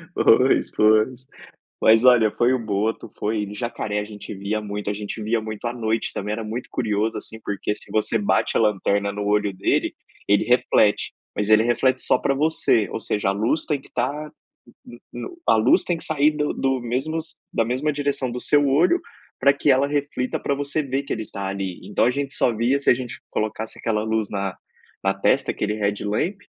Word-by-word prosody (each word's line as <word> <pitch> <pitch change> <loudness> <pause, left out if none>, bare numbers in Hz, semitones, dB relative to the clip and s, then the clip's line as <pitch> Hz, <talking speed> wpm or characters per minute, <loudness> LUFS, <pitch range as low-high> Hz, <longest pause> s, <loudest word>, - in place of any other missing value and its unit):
Pois, - - +4
pois. 110 +4 +2 0.5
Mas, 110 +2 +5
olha, 120 -4 +6
foi 120 +4 +2
o 130 - +2
boto, 110 -1 -2
foi 105 -1 -1
jacaré 110 -2 -3
a - - -4
gente 105 0 -9
via 100 +2 -2
muito, 105 -1 -4
a - - 0
gente 105 +1 -6
via 110 +2 0
muito 110 +1 -6
à 120 - -1
noite 115 -2 -2
também. 105 +1 -3
Era 110 +1 -3
muito 115 +3 -5
curioso, 110 -1 -1
assim, 110 - -9
porque, 100 +1 -2
se - - -13
você 110 - +1
bate 205 0 +1
a - - +4
lanterna 100 -1 +1
no 105 0 -4
olho 105 0 +1
dele, 95 - 0 0.3
ele 100 0 +4
reflete. 120 -4 +2 0.2
Mas 105 0 -1
ele 110 0 +6
reflete 120 +2 +1
só - - +2
pra 135 - 0
você, 145 -7 +2
ou - - -4
seja: 105 -2 -1
a - - +3
luz 110 +10 0
tem 145 -3 -1
que - - -18
estar 145 +5 -3 0.6
no - - -12
no - - -6
no 355 - -14
a - - +6
luz 110 - +4
tem 175 - -1
que - - -10
sair 150 -1 +2
do 150 -1 -1
do 135 -1 0
mesmos 155 +7 -3 0.2
da 115 - +2
mesma 130 +6 -1
direção 140 -3 -1
do 125 +1 -5
seu 145 -1 +3
olho 165 - +3 0.4
pra 140 - +5
que 145 +1 0
ela 135 +1 +4
reflita, 145 -3 -2
pra 140 - -1
você 145 +2 -2
ver 135 -1 -2
que 140 - -3
ele 110 -1 -5
tá 100 - -5
ali. 95 -2 -4
Então, 105 - +2
a 125 - +3
gente 140 +1 -3
só 125 - +2
via 120 +5 +2
se 140 - +1
a - - +8
gente 125 -1 -6
colocasse 110 +1 -3
aquela 110 -2 -1
luz 110 -1 0
na 100 -2 -3 0.5
na 95 0 +2
testa, 95 - +1
aquele 105 0 -2
headlamp. 105 - -1
115 Hz, 210 wpm, -23 LUFS, 105-135 Hz, 0.6 s, a